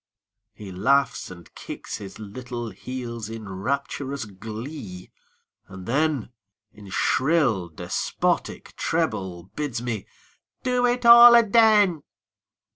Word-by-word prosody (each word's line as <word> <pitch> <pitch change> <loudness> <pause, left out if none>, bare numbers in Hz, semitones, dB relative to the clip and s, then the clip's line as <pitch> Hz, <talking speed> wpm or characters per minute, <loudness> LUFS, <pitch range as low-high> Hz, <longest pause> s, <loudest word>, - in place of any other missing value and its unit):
He 105 -2 -10
laughs 135 +10 +1
and 85 -2 -13
kicks - - -7
his 100 -2 -10
little 120 +2 -7
heels 115 +1 -7
in 110 -2 -8
rapturous 135 +6 -3
glee, 110 0 -8 0.6
and 95 -1 -10
then 140 -1 0 0.4
In 105 -2 -13
shrill, 130 - +1
despotic 80 - -3
treble 90 -3 -2
bids 145 -6 -3
me 115 -4 -4 0.6
"do 250 -1 +2
it 245 0 -1
all 235 0 +10
aden!" 215 -6 +4
120 Hz, 105 wpm, -24 LUFS, 100-155 Hz, 0.6 s, all